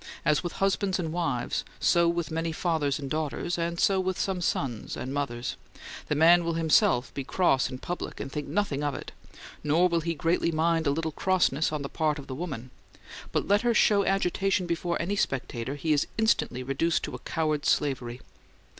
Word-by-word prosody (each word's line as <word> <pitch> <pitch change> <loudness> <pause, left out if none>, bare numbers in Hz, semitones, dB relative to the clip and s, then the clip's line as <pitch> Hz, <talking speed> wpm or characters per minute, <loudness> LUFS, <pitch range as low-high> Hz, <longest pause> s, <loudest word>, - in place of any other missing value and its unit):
As 150 - +3
with 175 - -4
husbands 195 -1 +1
and 165 -4 -3
wives, 165 -8 -1 0.2
so 170 -1 +4
with 170 -2 -1
many 165 +1 -1
fathers 160 -4 0
and 140 -2 -5
daughters, 155 +4 -2
and 170 0 -2
so 195 -1 +3
with 185 0 -1
some 190 -2 -1
sons 125 -9 -2
and 130 - -4
mothers: 130 -4 -3 0.5
the 150 - 0
man 170 +3 +6
will 170 0 -1
himself 165 - +3
be 140 - -4
cross 135 -4 +2
in 130 - -6
public 175 +7 -5
and 135 - -5
think 150 0 -4
nothing 150 -3 -1
of 145 -2 -1
it, - - -7 0.5
nor 160 +5 +4
will 170 -1 0
he 165 +1 -2
greatly 165 +2 +1
mind 165 0 +1
a - - +4
little 160 +3 -1
crossness 160 -4 +1
on 150 -2 -3
the - - -3
part 155 0 0
of 140 - -8
the 130 - -6
woman; 130 -5 -5 0.6
but - - -1
let 205 +1 +4
her 240 -1 +2
show 205 -1 +4
agitation 195 -1 +1
before 170 0 -1
any 190 +4 -1
spectator, 130 - -2
he 155 +2 0
is 145 - +1
instantly 220 - +1
reduced 135 +6 0
to - - -4
a - - -6
coward's 155 -2 -1
slavery. 125 -4 0
160 Hz, 195 wpm, -28 LUFS, 140-175 Hz, 0.6 s, man